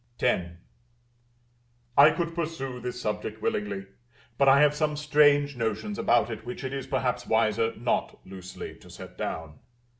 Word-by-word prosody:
X. 85 -1 +1 1.4
I 140 +2 +9
could 165 +2 -2
pursue 155 -7 -4
this 125 0 -5
subject 110 -1 -3
willingly, 100 -2 -2 0.5
but 135 +2 +4
I 135 +1 +6
have 150 -1 +5
some 150 0 -1
strange 145 -1 +4
notions 125 - -3
about 120 -1 +3
it 110 -1 -6
which 125 +3 -7
it 130 0 -4
is 135 -1 -4
perhaps 130 -2 -1
wiser 110 0 +2
not 120 +1 -1
loosely 95 -1 -8
to - - -16
set - - -11
down. 80 -2 -5
125 Hz, 150 wpm, -27 LUFS, 110-145 Hz, 1.4 s, I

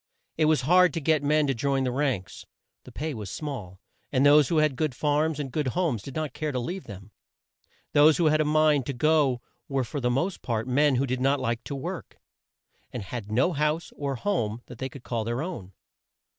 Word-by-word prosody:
It 160 - +2
was 155 -4 +3
hard 180 +7 +5
work - - -10
to 165 - -1
get 155 -1 +2
men 150 +1 +2
to 135 - +1
join 135 +2 0
the 125 - 0
ranks. 125 -8 -2 0.4
The - - -11
pay 155 +1 -4
was 105 -5 -6
small, 105 - -6 0.3
and 135 0 +3
those 145 -1 +6
who 165 - 0
had 155 -3 +3
good 145 -1 -1
farms 150 +1 +1
and 135 -3 -4
good 150 0 -1
homes 155 - 0
did 135 - -9
not 155 -4 -3
care 155 -1 -3
to 130 - -3
leave 175 +10 -5
them. 100 0 -11 0.8
Those 150 +1 +6
who 170 - +2
had 155 0 +4
a - - +3
mind 150 -3 +3
to 140 - -2
go 140 -2 +2 0.3
were 135 -2 0
for 145 +4 -5
the 125 -2 0
most 155 +10 -1
part 115 -1 -2
men 140 +2 +3
who 130 +2 +1
did 130 -1 -2
not 135 +2 +2
like 115 +1 -2
to 140 - -4
work, 135 - -6 0.7
and 120 - -5
had 105 +1 -6
no 130 +11 +2
house 150 +2 -1
or 140 -2 -3
home 120 - -2
they 130 +2 -6
could 130 -1 -12
call 115 -2 -2
their 120 +5 -2
own. 140 - -6
140 Hz, 220 wpm, -26 LUFS, 125-155 Hz, 0.8 s, those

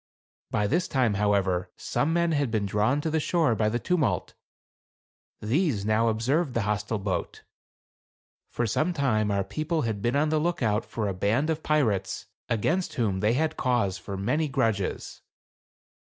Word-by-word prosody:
By 105 - 0
this 165 - +1
time, 125 -5 +1
however, 100 -3 +1
some 150 - -1
men 170 0 +2
had 145 -4 +1
been 110 -2 0
drawn 105 +8 +1
to 160 - -2
the 160 - +1
shore 155 -4 +2
by 110 -1 +1
the 115 - 0
tumult. 165 +3 0 1.1
These 115 - 0
now 110 +2 +2
observed 125 +7 0
the 115 - +1
hostile 105 +1 -1
boat. 95 -3 -3 1.1
For 120 - -1
some 155 +11 0
time 115 -9 +1
our 100 -1 +1
people 155 - -2
had 110 -3 -2
been 120 +5 0
on 150 +2 +2
the 155 0 +2
lookout 120 -10 0
for 110 -3 -3
a 100 - -1
band 115 - +1
of 160 0 -2
pirates, 110 -13 0 0.2
against 160 - 0
whom 105 -6 0
they 105 +3 +2
had 160 +4 0
cause 115 -7 0
for 100 +1 -6
many 125 +11 0
grudges. 115 -8 -1
115 Hz, 165 wpm, -27 LUFS, 105-150 Hz, 1.1 s, men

